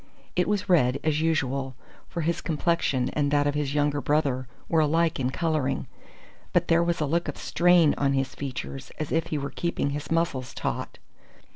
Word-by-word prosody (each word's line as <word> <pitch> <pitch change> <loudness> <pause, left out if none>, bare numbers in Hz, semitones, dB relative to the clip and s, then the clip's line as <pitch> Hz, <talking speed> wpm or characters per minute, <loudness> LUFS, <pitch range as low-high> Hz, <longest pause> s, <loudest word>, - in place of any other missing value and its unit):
It 180 - +2
was 205 -1 0
red, 140 -8 +3
as 155 -1 +1
usual, 135 -5 0 0.3
for 170 - -3
his 170 +2 -1
complexion 155 -5 0
and 145 -2 +1
that 145 0 +2
of 145 - +1
his 145 -1 -2
younger 145 -1 +1
brother 140 -4 +1 0.2
were 165 - +2
alike 160 +1 +2
in 125 -1 +1
colouring; 145 -2 -1 0.7
but - - +2
there 170 +1 +5
was 170 -1 0
a - - +2
look 170 +4 0
of - - -4
strain 175 -3 +4
on 140 -1 +2
his 135 -1 -1
features, 135 0 -6
as 155 - -4
if 165 +1 +1
he 155 - -2
were 140 0 -4
keeping 170 -4 -1
his 145 0 -5
muscles 165 -7 -1
taut. - - -3
150 Hz, 185 wpm, -26 LUFS, 140-165 Hz, 0.7 s, there